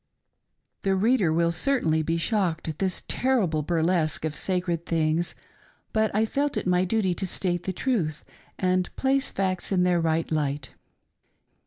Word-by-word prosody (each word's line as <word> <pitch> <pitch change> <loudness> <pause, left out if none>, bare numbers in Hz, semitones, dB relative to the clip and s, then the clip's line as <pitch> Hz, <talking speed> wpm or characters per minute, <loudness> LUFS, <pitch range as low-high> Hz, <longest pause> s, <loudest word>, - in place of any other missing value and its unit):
■ - - -54
The 195 -1 +1
reader 205 -3 +3
will 170 +1 +2
certainly 170 - +1
be 165 +2 0
shocked 170 -3 0
at 155 -2 -4
this 190 -1 -1
terrible 210 -12 +1
bur 165 +1 0
lesque 160 -3 +1
of 155 -1 -3
sacred 180 -3 -1
things, 165 +1 0 0.6
but 220 0 +2
I 220 +1 +3
felt 280 +5 -1
it - - -2
my 180 0 +3
duty 190 -2 +1
to 190 +2 -3
state 175 -1 -2
the 190 - 0
truth 180 - -1 0.3
and 185 -1 +1
place 270 0 +1
facts 185 -1 -2
in 185 -2 +3
their 180 -1 +3
right 165 0 0
light. 145 -3 -1
180 Hz, 165 wpm, -26 LUFS, 160-195 Hz, 0.6 s, reader